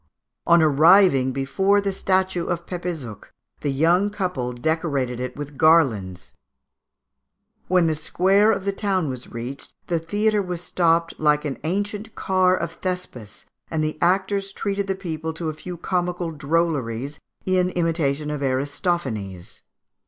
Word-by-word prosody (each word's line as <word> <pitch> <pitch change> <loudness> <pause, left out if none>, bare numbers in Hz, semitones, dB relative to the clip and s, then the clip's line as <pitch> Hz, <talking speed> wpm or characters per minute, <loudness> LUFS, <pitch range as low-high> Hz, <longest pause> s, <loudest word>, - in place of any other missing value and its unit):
On 170 -1 +6
arriving 155 -2 +5
before 190 +10 +2
the 200 -1 -1
statue 190 -2 0
of 175 -1 -2
Pepézuch 170 - -5 0.3
the 145 - -2
young 170 +8 +3
people 180 -12 -2
decorated 135 -2 -1
it 125 0 -4
with 145 -1 -8
garlands. 115 - +3 1.3
When 180 -1 +3
the 160 - +2
square 190 +7 +3
of 195 -2 -2
the 200 - +1
town 195 -6 -1
was 130 -1 -8
reached, 120 +4 -7
the 170 -2 0
theatre 205 +6 +1
was 180 -3 -4
stopped 165 -1 +1
like 150 -1 +3
the 145 -3 -4
ancient 205 +5 -3
car 185 -1 +2
of - - -3
Thespis, 180 - -5 0.2
and 160 -1 -1
the 155 0 -3
actors 195 +2 +1
treated 200 0 -2
the 195 - 0
people 160 -4 -4
to 165 -1 -3
a - - -3
few 175 +3 -8
comical 175 -1 -2
drolleries 145 -4 -1 0.3
in 185 -1 +2
imitation 155 -4 -1
of 150 -1 -4
Aristophanes. 130 - -2
165 Hz, 140 wpm, -23 LUFS, 140-185 Hz, 1.3 s, On